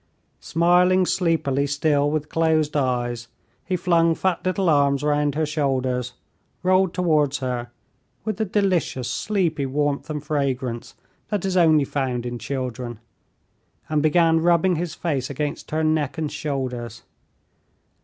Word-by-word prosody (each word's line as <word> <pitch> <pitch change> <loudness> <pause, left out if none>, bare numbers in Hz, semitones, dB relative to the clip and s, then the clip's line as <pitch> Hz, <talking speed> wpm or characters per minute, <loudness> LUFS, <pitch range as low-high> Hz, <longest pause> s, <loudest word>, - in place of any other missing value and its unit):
Smiling 180 +2 +3
sleepily 160 -7 +1
still 145 0 +1
with 150 0 -2
closed 160 -2 +1
eyes, 120 -3 -1 0.4
he 185 - -2
flung 170 -2 +2
fat 185 0 -1
little 185 0 0
arms 140 -3 +3
round 145 -1 +1
her 155 0 +1
shoulders, 130 -4 -1 0.5
rolled 185 0 +3
towards 155 -6 +1
her, 125 -2 -3 0.6
with 215 -3 -2
the 220 - 0
delicious 185 - 0
sleepy 170 - -1
warmth 145 +2 -1
and 150 -1 -4
fragrance 135 -5 -2 0.3
that 205 -3 -1
is 190 -1 -1
only 160 -5 +5
found 130 -4 -2
in 120 -1 -4
children, 125 -1 -4 0.9
and 155 -1 +1
began 165 +1 +4
rubbing 175 +2 +3
his 170 0 -3
face 140 -7 -2
against 145 +1 -4
her 160 +1 -1
neck 155 -1 0
and 155 -2 -2
shoulders. 130 -6 -4
150 Hz, 135 wpm, -23 LUFS, 135-170 Hz, 0.9 s, only